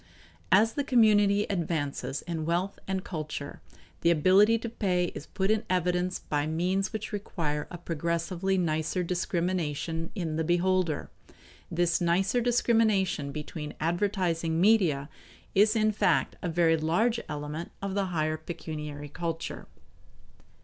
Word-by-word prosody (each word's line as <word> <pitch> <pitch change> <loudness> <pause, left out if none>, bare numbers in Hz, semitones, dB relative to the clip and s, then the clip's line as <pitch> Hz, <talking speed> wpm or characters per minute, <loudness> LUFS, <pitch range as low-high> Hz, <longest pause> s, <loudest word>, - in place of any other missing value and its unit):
As 225 +3 +5
the 285 - -1
community 210 -5 +4
advances 160 -7 -2
in 165 -2 -3
wealth 180 +4 -1
and 190 -1 -2
culture, 155 -5 -6 0.4
the 170 - +4
ability 190 +7 +5
to 230 - -5
pay 180 -6 0
is 145 - -8
put 190 +2 0
in 215 -1 +1
evidence 180 0 +1
by 145 0 -2
means 185 +4 0
which 220 -1 -5
require 160 -7 -3
a 175 - -7
progressively 170 +3 -1
nicer 165 +1 0
discrimination 170 -2 -2
in 165 -6 -2
the 160 - +1
beholder. 175 -1 +1 0.6
This 170 -1 +1
nicer 185 +7 +2
discrimination 220 -10 +2
between 150 0 -6
advertising 170 -2 0
media 175 -9 +3 0.5
is 210 +3 +4
in 215 -1 +3
fact 215 - +1
a 180 - -2
very 165 -1 +3
large 185 +10 +1
element 150 +2 -5
of 195 -1 -3
the 200 0 0
higher 155 -3 -1
pecuniary 150 -3 -6
culture. 165 +2 -5
175 Hz, 130 wpm, -28 LUFS, 160-195 Hz, 0.6 s, As